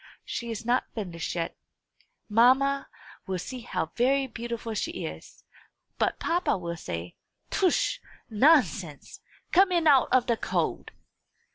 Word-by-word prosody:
She 235 - -4
is 225 0 -5
not 245 +2 +1
finished 180 -7 -4
yet. 165 -1 -3 0.7
Mamma 260 +5 +3 0.4
will 190 -1 -1
see 255 +8 -6
how 165 -8 -3
very 270 +3 +2
beautiful 235 -2 -5
she 335 +11 -3
is; - - -9 0.6
but - - +1
papa 350 - 0
will 170 -2 -4
say, 85 - -6 0.3
'Tush! 390 +6 +1 0.3
nonsense! 220 - +2 0.3
come 375 +1 +5
in 340 -2 +2
out 275 -4 +6
of 255 -1 +4
the 235 - +1
cold!'" - - -2
235 Hz, 130 wpm, -27 LUFS, 195-275 Hz, 0.7 s, out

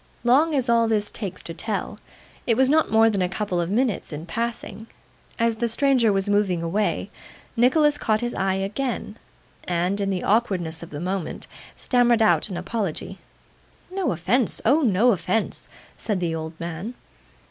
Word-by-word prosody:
Long 290 +6 +4
as 260 -2 0
all 230 -1 +3
this 210 -2 0
takes 190 -4 -6
to 165 - -6
tell, 210 +4 -3 0.5
it 230 - +3
was 265 +1 +4
not 315 +1 +3
more 225 0 +5
than 205 -4 +1
a 180 - +1
couple 190 -2 -2
of 170 - -3
minutes 230 -1 0
in 155 +2 -6
passing. 225 +2 -4 0.5
As 230 -1 +1
the 235 +1 0
stranger 250 -2 +3
was 195 0 0
moving 200 -4 +1
away, 190 +2 -1 0.4
Nicholas 295 +5 +3
caught 215 -1 +1
his 240 0 -2
eye 190 0 0
again, 210 +3 -3 0.5
and, 180 +3 0
in 195 - 0
the 190 -2 -2
awkwardness 185 -7 0
of 170 - -9
the 145 - -7
moment, 185 0 -4 0.3
stammered 240 -2 +3
out 215 - +3
an 185 - -4
apology. 195 -1 -4 0.7
'No 380 -1 -1
offence. 215 +8 +1
Oh 280 +8 +4
no 235 -1 +4
offence!' 205 +3 -2 0.3
said 210 -4 -1
the 170 -2 -1
old 160 0 -6
man. 175 +8 -5
210 Hz, 170 wpm, -24 LUFS, 180-235 Hz, 0.7 s, more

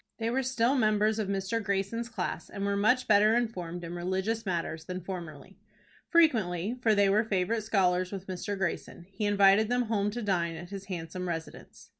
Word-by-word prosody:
They 230 0 -1
were 265 +2 +1
still 250 -1 +1
members 215 -3 +2
of 210 - -1
Mr. 195 +3 -1
Greyson's 200 +4 -2
class, 225 - -4
and 200 -1 -4
were 200 0 0
much 230 +6 +2
better 215 +1 +5
informed 180 -8 -2
in 170 0 -6
religious 190 +5 -2
matters 165 -3 -2
than 185 +1 -5
formerly. 175 -2 -8 0.5
Frequently 220 - +3
for 220 -3 +3
they 200 -1 +4
were 205 +3 +3
favorite 215 +1 0
scholars 185 -4 +1
with 195 -2 -6
Mr. 195 +2 -4
Greyson 175 -1 -3
he 200 +2 -3
invited 200 +1 +5
them 245 0 +2
home 210 -3 0
to 235 +3 -5
dine 170 -5 0
at 175 +3 -9
his 195 -1 -6
handsome 180 -1 -5
residence. 165 -2 -7
200 Hz, 185 wpm, -29 LUFS, 180-220 Hz, 0.5 s, better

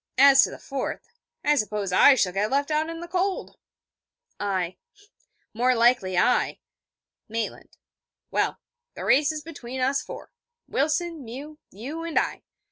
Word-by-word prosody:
As 275 0 +8
to - - +2
the - - -9
fourth, 270 -1 -5 0.4
I 295 - +5
suppose 210 -6 -1
I 275 +8 +7
shall 185 -7 +1
get 205 +3 0
left 280 +3 0
out 310 +1 +1
in 330 0 -6
the 345 - -7
cold.' 370 +2 -2 0.8
I: 185 -3 -2 0.8
'More 250 +3 +2
likely 230 -6 +3
I.' 250 - +2 0.7
Maitland: 225 0 -5 0.5
'Well, - - 0 0.4
the - - -6
race 290 +3 +4
is 305 -1 -6
between 260 -5 -7
us 270 +2 +1
four: - - -9 0.4
Wilson, 315 +2 -1
Mew, 280 +6 -9
you 275 - -7
and 335 -1 -3
I. - - 0
270 Hz, 145 wpm, -25 LUFS, 220-305 Hz, 0.8 s, As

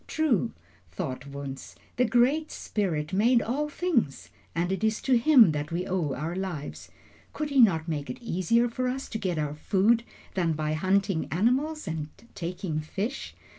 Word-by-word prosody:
"True," 305 - +1 0.4
thought 130 - -5
Wunzh, 140 -1 -7 0.2
"the 250 - +4
Great 260 +7 +3
Spirit 170 -6 -2
made 235 +5 +4
all 280 +7 -1
things, 290 - -1 0.2
and 175 +2 0
it 190 +3 -2
is 220 0 +2
to 265 - +3
him 240 - +7
that 150 +1 -3
we 175 +2 -1
owe 170 -7 -1
our 160 +6 -3
lives. 180 -6 -5 0.4
Could 300 -1 -3
he 275 - +3
not 175 -9 +5
make 145 -3 -3
it - - -4
easier 230 +2 +1
for 250 +2 -2
us 265 +2 -3
to 220 - -4
get 180 -5 -1
our 150 -1 -1
food 205 +9 +2 0.3
than 170 -4 +1
by 155 0 -1
hunting 190 +1 +1
animals 265 - +1
and 155 -2 -3 0.2
taking 175 -3 -3
fish? 205 - -4
190 Hz, 170 wpm, -27 LUFS, 160-240 Hz, 0.4 s, him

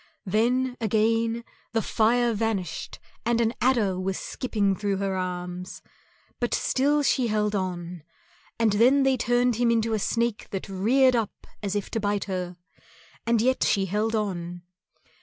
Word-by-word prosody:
Then, 245 +6 +1
again, 225 +1 +1 0.3
the 225 - +2
fire 235 +2 +2
vanished 210 -6 -2 0.3
and 235 0 +1
an 230 0 +2
adder 225 -7 +2
was 190 0 -2
skipping 205 -6 -1
through 200 0 -1
her 195 -1 -1
arms, 180 0 -5 0.6
but - - 0
still 290 +3 +2
she 255 -3 +2
held 210 -1 0
on; 180 -3 -3 0.6
and 225 -3 +2
then 255 +6 +5
they 270 -1 +3
turned 245 -1 +1
him 240 0 +2
into 225 -1 +1
a 215 - +1
snake 230 +1 -1
that 195 - -5
reared 245 +7 +3
up 225 -3 -3 0.2
as 200 -1 -2
if 205 - -3
to 225 - -1
bite 205 -1 0
her, 180 -2 -4 0.7
and 230 -1 +3
yet 260 +1 +2
she 195 -2 +2
held 210 +4 0
on. 175 -4 -3
215 Hz, 155 wpm, -26 LUFS, 195-235 Hz, 0.7 s, then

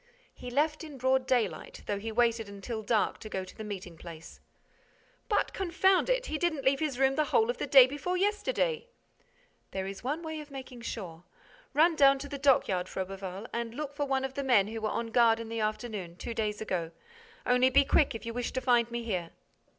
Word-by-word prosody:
"He 250 - -8
left 300 +5 0
in 300 -3 -9
broad 260 0 +1
daylight, 250 -4 -1
though 205 - -2
he 225 +2 -5
waited 230 -2 +1
until 210 +3 -5
dark 215 0 +1
to 215 - -8
go 190 -2 -3
to 185 - -13
the 220 - -7
meeting 190 -5 -7
place." 165 -1 -10 0.9
"But, 415 - +1
confound 380 +2 +2
it, - - +1
he 310 - -3
didn't 315 -6 -1
leave 270 +1 +3
his 300 -5 -1
room 270 0 +3
the 305 +2 +1
whole 450 +8 +3
of - - -10
the - - -2
day 270 -3 +9
before 290 +7 -3
yesterday!" 465 +4 0 0.8
"There 190 -1 -4
is 195 +2 -7
one 295 +7 -2
way 315 -1 -5
of 300 -1 -10
making 260 -3 -9
sure: 180 -8 -6 0.5
run 325 +3 +5
down 275 -2 +6
to 280 +1 -7
the 280 -1 -6
dockyard, 200 -10 +3
Froberval, 190 +1 -5
and 235 0 -3
look 290 0 -4
for 290 -1 -2
one 265 -1 0
of 265 - -5
the 280 - -3
men 220 -7 +4
who 225 0 -5
were 215 - 0
on 230 +1 -3
guard 230 -1 +4
in 230 -1 -6
the 230 0 -3
afternoon, 215 -5 -3
two 230 - -6
days 215 -2 -2
ago.—Only, 250 - -1
be 280 +2 +5
quick, 275 -3 +3
if 225 - -7
you 230 - -4
wish 245 0 -3
to 260 - 0
find 240 -2 +3
me 235 0 -4
here." 180 -7 -2
245 Hz, 210 wpm, -30 LUFS, 215-290 Hz, 0.9 s, day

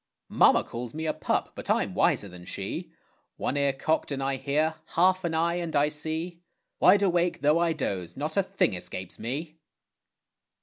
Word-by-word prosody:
Mamma - - +5
calls 120 +1 -6
me 160 +1 -3
a 155 - 0
pup, - - -1
but - - -7
I'm - - +1
wiser 100 - +2
than 90 -1 -11
she; - - -5 0.5
One - - -2
ear 140 -1 +2
cocked 150 +3 -1
and 135 -1 -2
I 135 0 0
hear, 150 +4 0 0.2
half 185 +2 +4
an 165 -2 -1
eye 170 +2 +1
and 170 -3 -3
I 145 +1 +4
see; 160 +3 -4 0.4
Wide 200 +2 +6
awake 175 -2 +1
though 150 +3 +4
I 170 -1 +2
doze, 95 - -4
not 150 +3 -3
a 195 - +4
thing 195 - 0
escapes 90 0 -5
me. 155 +7 -5
155 Hz, 180 wpm, -27 LUFS, 135-170 Hz, 0.5 s, Wide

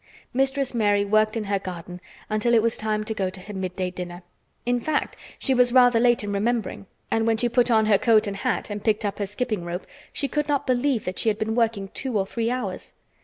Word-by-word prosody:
Mistress 270 +1 +1
Mary 205 -3 +2
worked 215 +2 +2
in 220 - -2
her 200 -1 -1
garden 180 -1 -8 0.3
until 215 +2 +2
it 225 - +4
was 230 -1 +1
time 215 -1 -1
to 220 - -3
go 195 -3 -1
to 185 0 -8
her 205 +3 -9
midday 185 -1 -3
dinner. 180 0 -7 0.4
In 245 0 +1
fact, 300 +4 -1 0.2
she 265 - 0
was 250 -1 +4
rather 245 -2 +6
late 240 -1 +3
in 205 0 -3
remembering, 215 -1 -1 0.2
and 225 0 +1
when 225 -1 +3
she 240 +2 +1
put 245 +1 +2
on 220 -2 +4
her 210 -2 +4
coat 225 -3 +4
and 200 -1 -4
hat, 250 -1 -2
and 205 0 -5
picked 215 -1 +1
up 205 - -3
her 200 - -1
skipping 215 -2 -2
rope, 175 +2 -5 0.3
she 280 - -1
could 295 +2 -1
not 285 -2 0
believe 255 -1 +1
that 185 0 -3
she 225 - +3
had 210 - 0
been 220 0 -1
working 225 -4 0
two 255 -1 -2
or 195 - +1
three 230 +3 -2
hours. 250 0 -4
220 Hz, 235 wpm, -24 LUFS, 200-245 Hz, 0.4 s, rather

